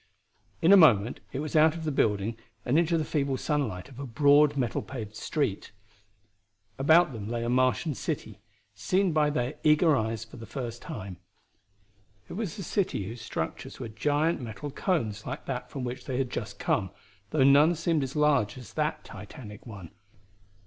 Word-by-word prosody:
In 175 +5 +7
a - - +10
moment 120 - +5
it 135 - -3
was 155 +1 -5
out 155 +1 +5
of 165 - -6
the 155 - -1
building 110 -4 +1 0.3
and 135 +6 +3
into 170 0 +2
the 155 - -1
feeble 140 -3 -1
sunlight 130 - -2
of 135 -2 -13
a 140 - -5
broad 145 +3 +4
metal 125 -4 0
paved 110 -5 -7
street. 140 -7 -2 1.1
About 160 +2 +5
them 105 -2 -6
lay 120 0 -2
a 120 - -2
Martian 130 +5 +2
city, 120 - -5 0.3
seen 185 - +1
by 150 -1 +3
their 130 -1 -2
eager 155 +1 +5
eyes 110 -2 -2
for 115 - -13
the 115 -1 -9
first 120 -2 -5
time. 95 -2 -7 1.1
It - - -7
was 205 0 -4
a 195 - -5
city 180 - -1
whose 115 +4 -7
structures 110 - -5
were - - -5
giant 145 +7 0
metal 120 +5 -6
cones 115 - -1
like - - -5
that 130 -2 -4
from 135 - -5
which 125 0 -5
they 130 -2 -3
had 130 -2 -1
just - - -5
come, 95 -2 0 0.4
though 150 -4 +2
none 145 +5 +6
seemed 165 -1 0
as 135 +1 -4
large 145 -8 +2
as 125 - -11
that 155 0 -1
titanic 105 +1 -11
one. 100 -6 -9
135 Hz, 180 wpm, -28 LUFS, 115-155 Hz, 1.1 s, a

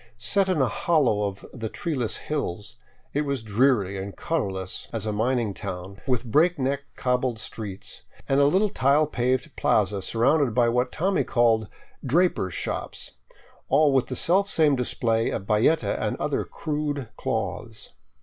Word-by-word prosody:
Set 190 - +2
in 180 -4 +1
a 130 - +3
hollow 120 -8 +2
of 100 0 -8
the 115 -3 -4
treeless 130 -8 -2
hills, 110 - -4 0.4
it 145 - +1
was 140 -5 -2
dreary 105 -3 +2
and 100 +1 -7
colorless 95 - -3
as - - -3
a 105 - -1
mining 115 0 0
town, 95 +1 -7
with 125 -2 0
breakneck 140 +1 +2 0.2
cobbled 125 -1 0
streets, 105 -3 -6 0.3
and 135 - +3
a 140 - +5
little 195 +7 +3
tile 145 -4 +3
paved 130 -3 -1
plaza 100 -1 +1
surrounded 125 +4 +2
by 120 -1 +4
what 125 +2 +1
Tommy 185 -2 +1
called 115 -3 +2 0.3
drapers' 140 - +1
shops," - - -4 0.6
all 150 -2 +4
with 135 -2 +2
the - - -4
selfsame 170 -5 +3
display 115 -2 0
of 95 - -4
bayeta 105 +2 +2
and - - -1
other - - -1
crude 150 -1 -3
colored 115 - -13
cloths. 110 +1 -4
125 Hz, 150 wpm, -25 LUFS, 105-145 Hz, 0.6 s, a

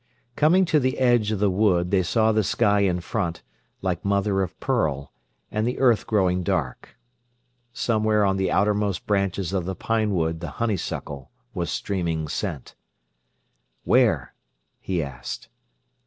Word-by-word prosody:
Coming 175 +5 +4
to 155 -3 +3
the 130 +1 0
edge 120 -4 +3
of 110 - 0
the 100 0 +2
wood, 90 -3 +2
they 95 -2 +3
saw 110 +5 +2
the 110 0 +2
sky 100 +2 +2
in 90 -3 +1
front, 85 0 -3 0.4
like 90 -3 -1
mother 100 0 +1
of 95 -1 -4
pearl, 75 - -1 0.4
and 110 +2 0
the 125 - -2
earth 120 -5 +3
growing 95 -4 +2
dark. 90 - -3 0.7
Somewhere 110 -3 +1
on 95 0 +1
the 95 -1 0
outermost 105 -2 +1
branches 100 -2 -1
of 95 -3 -1
the 95 +1 -3
pine 110 -1 0
wood 80 -1 0
the 85 -1 -5
honeysuckle 80 - -3 0.2
was 85 -4 -3
streaming 85 0 -2
scent. 70 -2 -4 1.1
"Where?" - - +2 0.5
he 90 -4 -2
asked. 65 -3 -7
100 Hz, 145 wpm, -24 LUFS, 90-110 Hz, 1.1 s, Coming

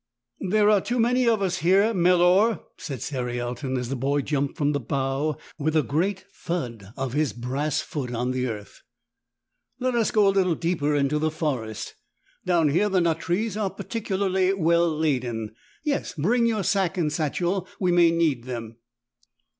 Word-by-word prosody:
"There 210 +1 +4
are 205 -2 +4
too 245 +5 -2
many 245 +2 +3
of 220 -3 +3
us 185 -2 -1
here, 195 +7 +4
Melor," 180 +4 +4 0.2
said 135 -7 -6
Cerialton 125 0 -3
as 125 -1 -3
the 135 - -2
boy 140 +3 0
jumped 140 -1 -1
from 145 -1 +1
the 145 - 0
bough 135 +4 -1 0.2
with 155 +2 0
a 155 - +4
great 185 +8 -1
thud 120 - -5
of 135 -2 -3
his 145 -5 0
12 120 - -12
brass 140 +4 -1
foot 135 -7 -5
on 125 +1 -1
the 130 0 -1
earth. 105 -3 -7 1.0
^'Let 255 0 0
us 235 -2 +2
go 210 -2 +4
a 195 - +4
little 185 -3 +2
deeper 155 -3 0
into 145 +1 +1
the 155 +1 +1
forest. 135 -9 -3 0.5
Down 170 -4 +3
here 190 +8 +2
the 190 -2 +2
nut 165 -2 +1
trees 190 +5 -1
are 210 -2 0
particularly 190 -3 -1
well 170 -2 +3
laden. 125 -9 -1 0.3
Yes, 295 -2 -2
bring 230 +10 +2
your 220 -3 0
sack 190 0 +1
and 155 -4 0
satchel, 175 +4 -1
we 180 -2 +2
may 175 -1 +5
need 160 -8 +1
them." 115 -3 -6
160 Hz, 175 wpm, -25 LUFS, 135-190 Hz, 1.0 s, may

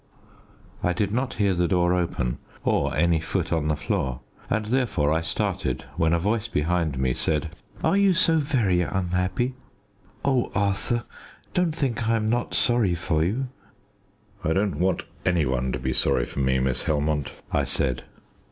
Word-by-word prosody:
I 90 - +1
did 100 +3 0
not 125 +4 -1
hear 100 -2 +2
the 90 -1 +1
door 90 +1 +2
open 85 -9 -1 0.2
or 70 0 +1
any 85 +1 +3
foot 80 +1 -2
on 80 -2 0
the 75 - +2
floor, 75 - -2 0.3
and 110 -1 0
therefore 110 - +1
I 80 - +1
started 80 -1 -1
when 80 0 +2
a 85 - +4
voice 105 +6 0
behind 80 - 0
me 65 -1 +1
said 75 +3 -1 0.3
"Are 160 +4 +3
you 200 -2 +4
so 165 -2 +4
very 120 - +2
unhappy? 90 +7 -1 0.7
Oh, 130 -3 +1
Arthur, 100 +3 0 0.5
don't 175 -3 +1
think 120 -6 -1
I 115 - +4
am 110 -1 0
not 120 0 0
sorry 115 -7 +4
for 80 -2 0
you!" 120 +10 -1 0.9
"I 80 - +1
don't 95 -5 0
want 90 0 +1 0.2
any 90 -4 +2
one 65 -1 0
to - - -1
be 65 0 -2
sorry - - +2
for - - -6
me, 65 -1 +2
Miss 65 -1 0
Helmont," 75 -2 0 0.2
I - - +2
said. 65 -3 -1
90 Hz, 170 wpm, -25 LUFS, 75-115 Hz, 0.9 s, a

